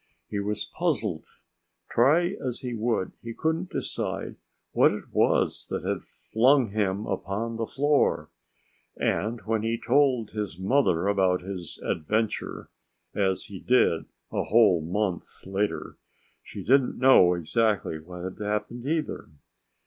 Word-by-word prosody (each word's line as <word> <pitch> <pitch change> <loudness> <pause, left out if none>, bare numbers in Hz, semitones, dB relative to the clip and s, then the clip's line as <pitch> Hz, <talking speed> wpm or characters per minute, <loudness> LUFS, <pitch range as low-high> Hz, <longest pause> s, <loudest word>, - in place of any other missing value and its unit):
He 105 - -1
was 105 +1 -2
puzzled. 120 - -1 0.7
Try 155 +9 +4
as 125 -1 -3
he 125 -2 -4
would, 115 -4 -1
he 115 -1 -7
couldn't 160 +3 -1
decide - - -4 0.4
what - - +5
it - - -7
was - - +2
that - - -4
had - - -1
flung 125 0 +2
him 100 -1 0
upon 100 +4 -3
the 115 -1 -2
floor. 145 +1 +1 0.7
And 115 +3 -1
when 110 -1 -1
he 115 +1 -1
told 125 -3 +2
his 105 -7 -4
mother 95 -4 +2
about 95 -3 +2
his 90 -3 -7
adventure 105 +7 -2 0.4
as 95 -2 0
he 100 -3 -9
did 105 -9 +2 0.3
a - - -1
whole 105 -6 +5
month 90 +3 -3
later 100 +2 -2 0.4
she - - -9
didn't 135 +1 +3
know 105 -9 +6
exactly 95 0 0
what 90 +2 -9
had 95 0 -6
happened, 105 +4 -3
either. 155 - -2
110 Hz, 135 wpm, -27 LUFS, 95-125 Hz, 0.7 s, know